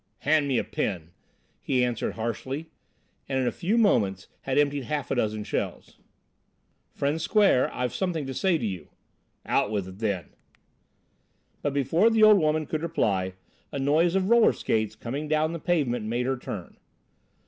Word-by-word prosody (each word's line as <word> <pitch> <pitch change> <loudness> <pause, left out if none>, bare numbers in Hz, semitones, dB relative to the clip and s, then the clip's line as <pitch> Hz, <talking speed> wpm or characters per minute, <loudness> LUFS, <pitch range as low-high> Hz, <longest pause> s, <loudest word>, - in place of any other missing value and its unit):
"Hand 150 0 +3
me 135 -3 +1
a - - +1
pin," 85 -5 -3 0.5
he 130 -2 +1
answered 120 -2 -1
harshly, 130 +7 -4 0.6
and 135 - 0
in 130 - +1
a - - +1
few 195 +6 -1
moments 105 - +2
had 135 0 -2
emptied 145 -2 +2
half 150 -4 -3
a - - +1
dozen 110 -3 -1
shells. - - -4 0.9
"Friend 145 +3 -1
Square, 200 - +3
I've 125 -1 -2
something 175 -6 -2
to 135 - -5
say 180 +5 +2
to 120 - -3
you." 95 -7 -5 0.6
"Out - - +1
with 100 -3 -2
it, 95 +1 -11
then." 100 -7 -2 1.3
But 145 -1 -2
before 160 - +3
the 225 -1 +3
old 215 -2 +8
woman 155 -1 +1
could 155 0 -3
reply, 100 - 0 0.4
a - - -4
noise 155 +6 +2
of 190 +2 +1
roller 235 -1 +6
skates 110 -1 -1
coming 135 +7 -5
down 155 +1 +1
the 170 - -4
pavement 140 -10 0
made 120 +2 -1
her 135 +1 0
turn. 105 -7 -7
135 Hz, 170 wpm, -26 LUFS, 110-160 Hz, 1.3 s, old